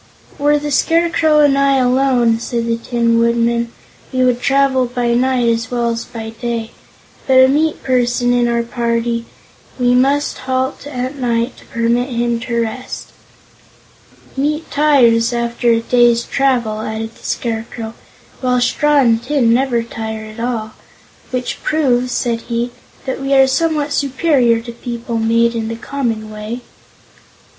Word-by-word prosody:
"Were 295 Hz, +1 st, +3 dB
the 295 Hz, 0 st, -4 dB
Scarecrow 325 Hz, 0 st, +3 dB
and 285 Hz, -2 st, +4 dB
I 275 Hz, -1 st, +3 dB
alone," 250 Hz, -2 st, +2 dB
said 235 Hz, 0 st, -3 dB
the 230 Hz, 0 st, 0 dB
Tin 230 Hz, 0 st, +1 dB
Woodman, 235 Hz, 0 st, +1 dB, 0.4 s
"we 255 Hz, -1 st, +1 dB
would 245 Hz, -1 st, +1 dB
travel 270 Hz, -1 st, +2 dB
by 240 Hz, -1 st, -1 dB
night 250 Hz, 0 st, +1 dB
as 230 Hz, -1 st, 0 dB
well 240 Hz, -1 st, 0 dB
as 230 Hz, 0 st, -4 dB
by 225 Hz, -1 st, -7 dB
day; 230 Hz, 0 st, -4 dB, 0.6 s
but 265 Hz, -, +3 dB
with 260 Hz, 0 st, +8 dB
a -, -, +3 dB
meat 310 Hz, +1 st, 0 dB
person 245 Hz, -1 st, +1 dB
in 245 Hz, -1 st, +2 dB
our 235 Hz, 0 st, 0 dB
party, 235 Hz, 0 st, -2 dB, 0.5 s
we 245 Hz, 0 st, +3 dB
must 275 Hz, +3 st, +1 dB
halt 260 Hz, +2 st, -2 dB
at 260 Hz, 0 st, -4 dB
night 240 Hz, -1 st, -1 dB
to -, -, -16 dB
permit 235 Hz, +2 st, 0 dB
him 235 Hz, -1 st, -1 dB
to 235 Hz, 0 st, -2 dB
rest." 230 Hz, +3 st, -6 dB, 1.3 s
"Meat 300 Hz, +4 st, -2 dB
tires, 245 Hz, -6 st, +3 dB
after 235 Hz, 0 st, -1 dB
a 230 Hz, 0 st, +3 dB
day's 240 Hz, 0 st, +3 dB
travel," 240 Hz, -6 st, 0 dB
added 220 Hz, +1 st, -5 dB
the -, -, -21 dB
Scarecrow, 225 Hz, -1 st, -4 dB, 0.5 s
"while 250 Hz, -1 st, +1 dB
straw 295 Hz, +4 st, +2 dB
and 230 Hz, -3 st, +3 dB
tin 245 Hz, -4 st, +2 dB
never 245 Hz, -2 st, +1 dB
tire 220 Hz, -1 st, -6 dB
at 215 Hz, +1 st, -11 dB
all. 230 Hz, -2 st, -3 dB, 0.6 s
Which 250 Hz, -1 st, -3 dB
proves," 255 Hz, -5 st, +1 dB
said 235 Hz, -1 st, -1 dB
he, 235 Hz, +1 st, -1 dB, 0.3 s
"that 265 Hz, 0 st, -3 dB
we 275 Hz, 0 st, 0 dB
are 270 Hz, 0 st, +7 dB
somewhat 300 Hz, +1 st, 0 dB
superior 270 Hz, -5 st, +2 dB
to 235 Hz, +1 st, -8 dB
people 235 Hz, 0 st, -5 dB
made 230 Hz, +1 st, +2 dB
in 225 Hz, -1 st, -3 dB
the 230 Hz, -, -4 dB
common 230 Hz, -4 st, -3 dB
way." 215 Hz, +3 st, -6 dB
240 Hz, 155 wpm, -17 LUFS, 230-265 Hz, 1.3 s, with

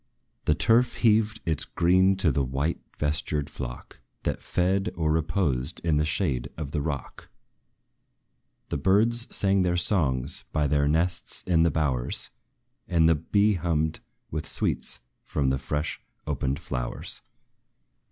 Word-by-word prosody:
The 75 Hz, -, +3 dB
turf 120 Hz, +8 st, +3 dB
heaved 110 Hz, 0 st, +3 dB
its 80 Hz, -3 st, +1 dB
green 95 Hz, +3 st, +3 dB
to 95 Hz, -4 st, +4 dB
the 70 Hz, +1 st, 0 dB
white 70 Hz, +6 st, -2 dB, 0.2 s
vestured 75 Hz, 0 st, -1 dB
flock, 60 Hz, -1 st, -8 dB, 0.2 s
That -, -, -2 dB
fed, 95 Hz, +2 st, 0 dB
or 80 Hz, -2 st, 0 dB
reposed 80 Hz, -3 st, 0 dB
in 80 Hz, -3 st, +2 dB
the 75 Hz, -, +1 dB
shade 75 Hz, -5 st, -1 dB
of 75 Hz, -3 st, -5 dB
the 75 Hz, -, -1 dB
rock; 70 Hz, -2 st, -5 dB, 1.4 s
The -, -, -2 dB
birds 115 Hz, +8 st, +3 dB
sang 100 Hz, -1 st, +3 dB
their 90 Hz, -1 st, +1 dB
songs 75 Hz, -, +4 dB
by 75 Hz, -1 st, +1 dB
their 70 Hz, 0 st, +2 dB
nests 80 Hz, +4 st, 0 dB
in 85 Hz, -3 st, +2 dB
the 85 Hz, -, +4 dB
bowers; 70 Hz, -6 st, -2 dB, 0.6 s
And 80 Hz, -2 st, +3 dB
the 80 Hz, -, +5 dB
bee 100 Hz, +7 st, +2 dB
hummed 80 Hz, -3 st, 0 dB, 0.3 s
with 80 Hz, +1 st, -4 dB
sweets -, -, -2 dB, 0.2 s
from 70 Hz, -3 st, 0 dB
the 65 Hz, -, -1 dB
fresh 75 Hz, +4 st, -3 dB, 0.2 s
opened 70 Hz, -2 st, -1 dB
flowers. 60 Hz, -1 st, -4 dB
80 Hz, 140 wpm, -26 LUFS, 70-95 Hz, 1.4 s, the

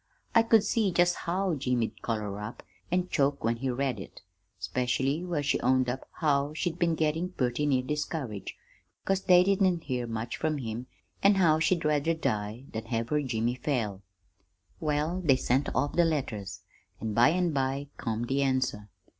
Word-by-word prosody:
I 230 Hz, -, +7 dB
could 225 Hz, -2 st, +4 dB
see 215 Hz, -2 st, +1 dB
just 175 Hz, 0 st, +3 dB
how 185 Hz, +1 st, -1 dB
Jimmy'd 125 Hz, -5 st, -1 dB
color 105 Hz, -3 st, -3 dB
up 105 Hz, +3 st, -7 dB, 0.3 s
an' 180 Hz, +1 st, +1 dB
choke 140 Hz, -1 st, +1 dB
when 115 Hz, +1 st, +1 dB
he 130 Hz, +2 st, -2 dB
read 130 Hz, -2 st, -1 dB
it, 95 Hz, -, -10 dB, 0.4 s
specially 125 Hz, -, -1 dB
where 170 Hz, -5 st, -2 dB
she 145 Hz, -, +1 dB
owned 130 Hz, 0 st, +2 dB
up 130 Hz, +2 st, -5 dB
how 145 Hz, -2 st, +1 dB
she'd 175 Hz, +1 st, -2 dB
been 170 Hz, -2 st, +2 dB
gettin' 160 Hz, +3 st, 0 dB
purty 125 Hz, +2 st, 0 dB
near 130 Hz, -3 st, +2 dB
discouraged 145 Hz, -, -4 dB, 0.5 s
'cause 195 Hz, 0 st, +1 dB
they 180 Hz, -1 st, +6 dB
didn't 185 Hz, -3 st, +2 dB
hear 125 Hz, -4 st, -2 dB
much 115 Hz, +1 st, -4 dB
from 155 Hz, -1 st, 0 dB
him, 120 Hz, -1 st, -5 dB, 0.3 s
an' 200 Hz, +1 st, +5 dB
how 165 Hz, -5 st, +4 dB
she'd 165 Hz, 0 st, +1 dB
rather 150 Hz, +2 st, +2 dB
die 110 Hz, -5 st, -2 dB
than 110 Hz, -, -4 dB
have 115 Hz, -1 st, -2 dB
her 150 Hz, 0 st, +2 dB
Jimmy 120 Hz, -3 st, -1 dB
fail. 120 Hz, -7 st, -2 dB, 0.8 s
"Well, 155 Hz, +4 st, -1 dB
they 140 Hz, -5 st, +5 dB
sent 130 Hz, +2 st, +1 dB
off 145 Hz, +3 st, +1 dB
the 175 Hz, -, +4 dB
letters, 105 Hz, -, -2 dB, 0.4 s
an' 110 Hz, -1 st, -3 dB
by 120 Hz, +3 st, +6 dB
an' 175 Hz, +1 st, +1 dB
by 135 Hz, 0 st, -1 dB
come 115 Hz, -2 st, -2 dB
the 135 Hz, +3 st, 0 dB
answer. 130 Hz, -6 st, 0 dB
140 Hz, 175 wpm, -29 LUFS, 120-165 Hz, 0.8 s, I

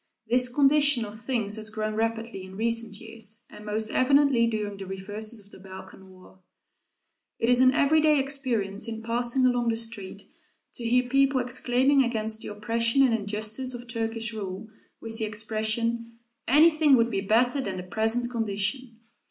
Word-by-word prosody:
This 250 Hz, +1 st, +3 dB
condition 285 Hz, -1 st, +4 dB
of 210 Hz, +1 st, -9 dB
things 225 Hz, -3 st, -2 dB
has 220 Hz, 0 st, -2 dB
grown 215 Hz, 0 st, -3 dB
rapidly 225 Hz, -2 st, -3 dB
in 190 Hz, 0 st, -11 dB
recent 230 Hz, -2 st, 0 dB
years, 225 Hz, 0 st, -6 dB
and 210 Hz, -, -12 dB
most 215 Hz, +1 st, -3 dB
evidently 275 Hz, -3 st, +3 dB
during 210 Hz, -3 st, -3 dB
the 195 Hz, -1 st, -8 dB
reverses 210 Hz, +4 st, -4 dB
of 200 Hz, 0 st, -16 dB
the -, -, -14 dB
Balkan 190 Hz, 0 st, -12 dB
war. 185 Hz, 0 st, -18 dB, 1.0 s
It 230 Hz, -, 0 dB
is 250 Hz, 0 st, +4 dB
an 255 Hz, 0 st, +6 dB
everyday 305 Hz, +2 st, +3 dB
experience, 245 Hz, -7 st, -1 dB
in 225 Hz, -1 st, -6 dB
passing 240 Hz, +3 st, +1 dB
along 245 Hz, -1 st, +1 dB
the 225 Hz, -, +1 dB
street, 225 Hz, -4 st, -4 dB, 0.5 s
to 240 Hz, -, -9 dB
hear 250 Hz, +2 st, +2 dB
people 275 Hz, +1 st, +2 dB
exclaiming 255 Hz, +2 st, +2 dB
against 220 Hz, -2 st, -2 dB
the -, -, -6 dB
oppression 230 Hz, +5 st, +1 dB
and 255 Hz, -3 st, +3 dB
injustice 215 Hz, +4 st, -3 dB
of 245 Hz, 0 st, -9 dB
Turkish 225 Hz, -1 st, -3 dB
rule, 200 Hz, 0 st, -6 dB, 0.3 s
with 225 Hz, 0 st, -4 dB
the 220 Hz, -, 0 dB
expression, 220 Hz, +2 st, -2 dB, 0.3 s
"Anything 310 Hz, +1 st, +5 dB
would 235 Hz, -1 st, +2 dB
be 195 Hz, -2 st, -1 dB
better 245 Hz, +7 st, +2 dB
than 195 Hz, -6 st, -4 dB
the 180 Hz, -, -5 dB
present 225 Hz, +5 st, -1 dB
condition." 225 Hz, +2 st, -2 dB
230 Hz, 165 wpm, -26 LUFS, 215-250 Hz, 1.0 s, an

